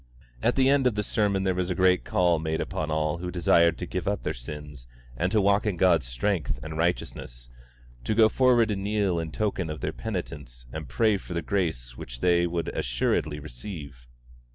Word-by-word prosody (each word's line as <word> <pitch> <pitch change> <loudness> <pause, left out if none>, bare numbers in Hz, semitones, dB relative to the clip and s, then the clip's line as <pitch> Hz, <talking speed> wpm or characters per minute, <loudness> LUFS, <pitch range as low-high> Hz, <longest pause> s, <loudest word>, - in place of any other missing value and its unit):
At - - +2
the 130 -1 +4
end 135 -1 +4
of 120 - 0
the 105 - 0
sermon 100 -2 +1
there 95 -1 +1
was 90 0 -1
a 90 - -1
great 90 0 +3
call 85 -2 +2
made 80 0 -2
upon 80 0 -3
all 75 +1 0
who 90 0 -4
desired 85 -2 +3
to 90 - -4
give 90 0 -4
up 100 0 -1
their - - -1
sins 75 0 -9 0.3
and 90 +8 0
to 110 - +3
walk 100 +2 +3
in 100 -4 -1
God's 85 -8 +3
strength 85 +8 -1
and 80 0 -6
righteousness, - - -3 0.5
to 110 - 0
go 110 0 +7
forward 120 -1 +3
and 95 -1 -2
kneel 100 -4 +1
in 80 -1 -4
token 95 -4 -1
of 75 - -5
their - - -2
penitence 70 - -6
and 80 -4 -6
pray 110 - +2
for 90 -2 -8
the 85 - -1
grace 70 -11 -2
which - - -8
they 85 +3 +3
would 85 -1 -2
assuredly 70 +5 -1
receive. 70 -2 -9
85 Hz, 200 wpm, -27 LUFS, 75-100 Hz, 0.5 s, go